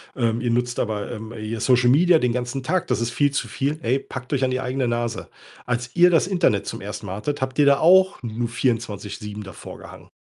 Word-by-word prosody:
ähm, 115 -2 0
ihr 120 -1 0
nutzt 120 0 -1
aber, 105 0 -2
ähm, 110 -1 -7
hier 110 0 -5
Social 125 +1 +3
Media 165 +5 +5
den 125 -4 +1
ganzen 125 +2 -3
Tag, 170 +7 0
das - - 0
ist 115 - 0
viel 145 +3 +2
zu 145 - -2
viel.“ 145 +3 -2
Ey, 125 +1 +1
packt 130 -2 -9
euch 135 -1 +1
an 130 - +1
die 130 0 -1
eigene 130 0 -1
Nase. 120 -1 -2 0.4
Als 120 0 -3
ihr 175 0 +6
das 165 +1 +3
Internet 175 - +1
zum - - -5
1. - - -7
Mal 95 - -4
hattet, 145 +7 -3
habt 130 0 -3
ihr 145 - +6
da 140 -1 +5
auch 190 +3 +5
nur 120 0 -3
24 115 -4 -2
7 105 0 -7
davorgehangen. 95 -3 -11
125 Hz, 230 wpm, -23 LUFS, 115-140 Hz, 0.4 s, ihr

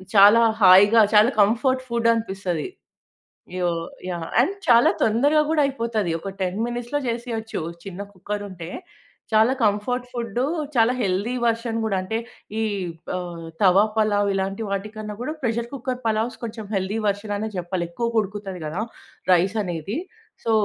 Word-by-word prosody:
చాలా 205 +3 +8 0.2
హాయిగా, 205 +4 +8
చాలా 215 +5 +6
కంఫర్ట్ 255 +5 +2
ఫుడ్ 235 0 +2
అనిపిస్తది. 190 -8 -3 0.9
యో 175 -1 +1 0.4
యాహ్! 170 -2 -4
అండ్, 385 +10 0
చాలా 235 -1 +6
తొందరగా 285 +8 +3
గూడా 310 -2 +3
అయిపోతది. 230 -9 -1
ఒక 195 - -5
10 185 +3 -2
మినిట్స్‌లో 240 +4 -3
జేసేయచ్చు, 230 -5 -3 0.2
చిన్న 195 0 -6
కుక్కర్ 205 +2 -5
ఉంటే. 175 -1 -8 0.6
చాలా 220 +4 +5
కంఫర్ట్ 225 +4 0
ఫుడ్డు, 235 0 -2 0.3
చాలా 235 +1 +4
హెల్దీ 200 +4 0
వెర్షన్ 230 0 0
గూడా 200 -3 0
అంటే 205 +4 -2 0.4
ఈ - - +1 0.6
ఆహ్, 170 -2 -6 0.2
తవా 195 +1 +6
పలావ్ 205 -2 +2
ఇలాంటి 195 +3 -2
వాటి 200 +2 -2
కన్నా 215 -1 -5
గూడా 305 +5 -3
ప్రెషర్ 235 0 -1
కుక్కర్ 255 -1 -3
పలావ్స్ 220 +2 0
కొంచెం 220 -1 -5
హెల్దీ 195 +3 -1
వెర్షన్ 205 +1 -1
అనే 220 +1 -3
జెప్పాలి. 175 0 -2
ఎక్కువగ 230 +3 0
ఉడుకుతది 195 -3 -6
గదా, 160 +7 -3 0.5
రైస్ 190 +5 +2
అనేది. 180 - -4 0.5
సో, 230 - +1
215 Hz, 145 wpm, -23 LUFS, 195-235 Hz, 0.9 s, చాలా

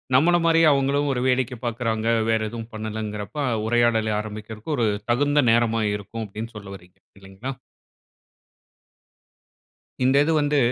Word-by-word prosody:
நம்மள 175 +6 +5
மாரியே 165 -1 +5
அவுங்களும் 140 +1 +1
ஒரு 125 - -2
வேடிக்கை 125 -1 0
பார்க்கிறாங்க. 115 -1 -2 0.2
வேற 110 0 +3
எதுவும் 115 0 -8
பண்ணலங்கிறப்ப 110 +3 -5 0.3
உரையாடலை 115 -2 +2
ஆரம்பிக்கிறக்கு 110 +6 -6
ஒரு 115 -2 +2 0.2
தகுந்த 145 +4 +3
நேரமா 115 -1 +2
இருக்கும் 110 +3 -6
அப்பிடின்னு 110 +3 -8
சொல்ல 100 -1 -10
வர்றீங்க! 90 -1 -17 0.2
இல்லீங்களா! 95 +8 -7 2.5
இந்த 130 +2 +3
இது 165 - 0
வந்து 145 0 +1
115 Hz, 125 wpm, -23 LUFS, 110-135 Hz, 2.5 s, நம்மள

